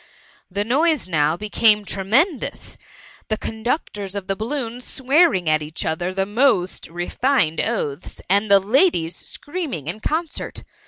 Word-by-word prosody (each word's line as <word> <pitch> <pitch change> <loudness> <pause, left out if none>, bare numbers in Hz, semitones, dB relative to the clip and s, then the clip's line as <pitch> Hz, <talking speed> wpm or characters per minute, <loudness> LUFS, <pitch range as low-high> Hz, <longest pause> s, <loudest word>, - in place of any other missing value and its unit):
The 200 +2 -1
noise 290 - +1
now 155 -2 +1
became 210 0 +3
tremendous; 235 - 0 0.5
the 215 - -1
con 220 0 -6
ductors 205 - -2
of 200 -2 -4
the 195 - -1
balloons 240 +2 -3
swearing 265 - +2
at 155 0 +3
each 150 +1 -4
other 175 +3 -1
the 190 +1 -1
most 205 -4 +1
refined 175 - +1
oaths, 165 -9 -3
and 200 +3 +2
the 200 0 +7
ladies 200 - +2
screaming 290 - -5
in 170 +7 -4
concert. 315 +6 -3
210 Hz, 140 wpm, -21 LUFS, 180-265 Hz, 0.5 s, the